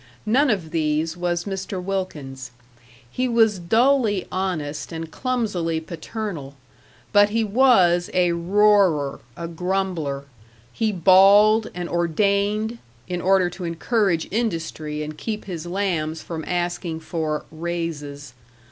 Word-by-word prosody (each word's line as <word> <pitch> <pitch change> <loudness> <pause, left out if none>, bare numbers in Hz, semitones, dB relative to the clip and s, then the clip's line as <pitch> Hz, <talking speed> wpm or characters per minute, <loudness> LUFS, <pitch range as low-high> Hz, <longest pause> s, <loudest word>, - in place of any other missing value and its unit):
None 265 +7 +3
of 185 -8 -1
these 160 0 0
was 175 -1 -1
Mr. 190 -1 -4
Wilkins. 150 -9 -4 0.6
He 255 - -2
was 225 -4 +3
dully 225 +2 +2
honest 170 -6 -3
and 165 -1 -6
clumsily 205 -11 -1
paternal. 165 -3 -6 0.6
But 205 0 +6
he 225 +2 +1
was 200 -7 +4
a 180 -1 +2
roarer, 180 -4 +3 0.2
a 170 - -4
grumbler; 170 -5 -2 0.5
he 220 - 0
bawled 200 +4 +6
and 175 -1 -4
ordained, 200 +6 0 0.3
in 180 -1 -3
order 190 0 +3
to 180 - -8
encourage 175 +1 0
industry 165 -8 -2
and 155 0 -6
keep 215 +6 -5
his 175 -3 -6
lambs 175 -4 -2
from 160 -2 -5
asking 175 -2 -2
for 160 -2 -3
"raises." 155 -5 -5
180 Hz, 120 wpm, -23 LUFS, 160-205 Hz, 0.6 s, But